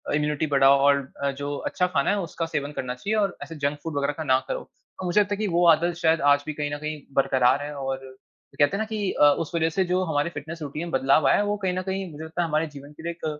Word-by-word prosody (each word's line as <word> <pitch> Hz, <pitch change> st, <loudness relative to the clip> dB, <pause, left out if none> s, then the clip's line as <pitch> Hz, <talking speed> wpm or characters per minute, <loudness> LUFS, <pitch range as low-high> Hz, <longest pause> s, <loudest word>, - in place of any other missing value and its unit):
Immunity 150 Hz, +1 st, 0 dB
बढ़ाओ 135 Hz, 0 st, +6 dB
और 140 Hz, -, +5 dB, 0.3 s
अ, 140 Hz, -, +1 dB
जो 140 Hz, +1 st, -4 dB
अच्छा 180 Hz, -, +1 dB
खाना 140 Hz, -6 st, 0 dB
है 205 Hz, -, +2 dB
उसका 170 Hz, -2 st, -3 dB
सेवन 145 Hz, -3 st, -3 dB
करना 130 Hz, -4 st, -4 dB
चाहिए 200 Hz, +12 st, -2 dB
और 200 Hz, -3 st, 0 dB
ऐसे 165 Hz, -, -9 dB
जंक 145 Hz, +1 st, +1 dB
फूड 160 Hz, -3 st, -4 dB
वग़ैरह 140 Hz, +1 st, 0 dB
का 160 Hz, -, -3 dB
ना 130 Hz, -2 st, +3 dB
करो। -, -, -2 dB, 0.4 s
तो 185 Hz, -, -4 dB
मुझे 180 Hz, +3 st, +3 dB
लगता 205 Hz, 0 st, -1 dB
है -, -, -11 dB
की 215 Hz, -, 0 dB
वो 175 Hz, +1 st, +3 dB
आदत 170 Hz, +3 st, -1 dB
शायद 165 Hz, -1 st, +3 dB
आज 145 Hz, 0 st, -1 dB
भी 155 Hz, -, -2 dB
कहीं 145 Hz, 0 st, -3 dB
न -, -, -5 dB
कहीं 150 Hz, 0 st, -5 dB, 0.2 s
बरकरार 130 Hz, 0 st, +3 dB
है 150 Hz, 0 st, -5 dB
और 135 Hz, -1 st, -3 dB, 0.6 s
कहते 145 Hz, +6 st, +3 dB
हैं -, -, -4 dB
ना 220 Hz, -, 0 dB
कि 215 Hz, -3 st, -2 dB
अ, -, -, +1 dB, 0.2 s
उस 165 Hz, -3 st, -4 dB
वजह 165 Hz, -1 st, +2 dB
से 190 Hz, -, +3 dB
जो 185 Hz, +1 st, +2 dB
हमारी 155 Hz, -1 st, 0 dB
फ़िटनेस 160 Hz, +1 st, -8 dB
रूटीन 150 Hz, +1 st, -5 dB
में -, -, -8 dB
बदलाव 135 Hz, +3 st, +4 dB
आया -, -, +5 dB
है 205 Hz, -, +2 dB
वो 205 Hz, 0 st, -1 dB
कहीं 190 Hz, -3 st, -1 dB
न -, -, 0 dB
कहीं 190 Hz, -2 st, -3 dB
मुझे 155 Hz, +2 st, -8 dB
लगता 160 Hz, +2 st, -3 dB
है 170 Hz, -, 0 dB
हमारे 155 Hz, +1 st, 0 dB
जीवन 140 Hz, +1 st, -10 dB
के 160 Hz, -, -13 dB
लिए 170 Hz, -, -2 dB
एक -, -, -4 dB
155 Hz, 285 wpm, -25 LUFS, 145-175 Hz, 0.6 s, बढ़ाओ